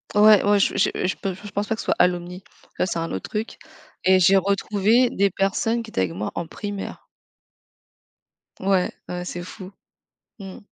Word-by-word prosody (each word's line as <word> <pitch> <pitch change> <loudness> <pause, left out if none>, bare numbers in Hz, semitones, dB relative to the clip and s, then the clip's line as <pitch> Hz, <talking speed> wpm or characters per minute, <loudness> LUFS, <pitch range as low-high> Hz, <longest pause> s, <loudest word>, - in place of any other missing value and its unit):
Ouais, 210 -1 +7
ouais, 205 0 +4
je - - +1
je - - +3 0.2
je 185 - 0
pen 190 -2 -3
je 205 +2 -11
pense 205 +1 -2
pas 225 - 0
que - - -6
ce - - -10
soit - - +1
à - - +7
Alumni. 180 +1 -3 0.4
Ça, - - +1
c'est 170 -2 -2
un 165 - -3
autre 95 - -5
truc 215 +2 -4 0.5
et 185 0 +6
j'ai 195 +3 +6
retrouvé 205 +5 +2
des 200 -3 +1
personnes 195 +5 0
qui 225 - -11
étaient - - -3
avec 90 -3 -1
moi 105 +3 -4
en 170 - -3
primaire. 205 +3 -7 1.5
Ouais, 190 -1 +1 0.2
ouais, 180 0 -4
c'est 175 0 -5
fou. 185 +1 -10 0.7
Mmh. 195 -2 -9
195 Hz, 195 wpm, -23 LUFS, 180-205 Hz, 1.5 s, Ouais